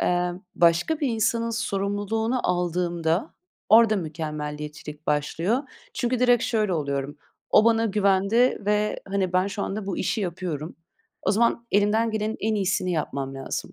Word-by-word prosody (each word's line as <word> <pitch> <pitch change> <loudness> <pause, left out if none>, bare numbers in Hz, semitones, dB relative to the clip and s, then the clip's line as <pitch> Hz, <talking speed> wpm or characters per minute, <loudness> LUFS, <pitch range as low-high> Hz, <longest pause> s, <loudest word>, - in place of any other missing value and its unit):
Emm, 180 0 0
başka 175 - +3
bir 285 - +1
insanın 230 +1 0
sorumluluğunu 220 +2 -1
aldığımda, 175 - -1 0.3
orada 220 0 +6
mükemmeliyetçilik 150 -2 -6
başlıyor. 165 - 0 0.4
Çünkü 245 0 0
direkt 245 -1 +4
şöyle 215 -5 0
oluyorum, 140 -1 -3 0.3
"O 215 - +6
bana 230 0 +3
güvendi 200 +4 +3
ve 210 0 +1
hani, 190 -2 -1
ben 185 +1 +2
şu 200 0 -4
anda 200 0 -4
bu 195 - -2
işi 220 - -1
yapıyorum, 170 -4 -4 0.5
o 195 - +1
zaman 235 +2 +1
elimden 210 +3 +3
gelenin 220 0 -2
en 220 +1 0
iyisini 190 -2 0
yapmam 140 -4 -3
lazım." 135 0 -5
195 Hz, 140 wpm, -25 LUFS, 165-220 Hz, 0.5 s, orada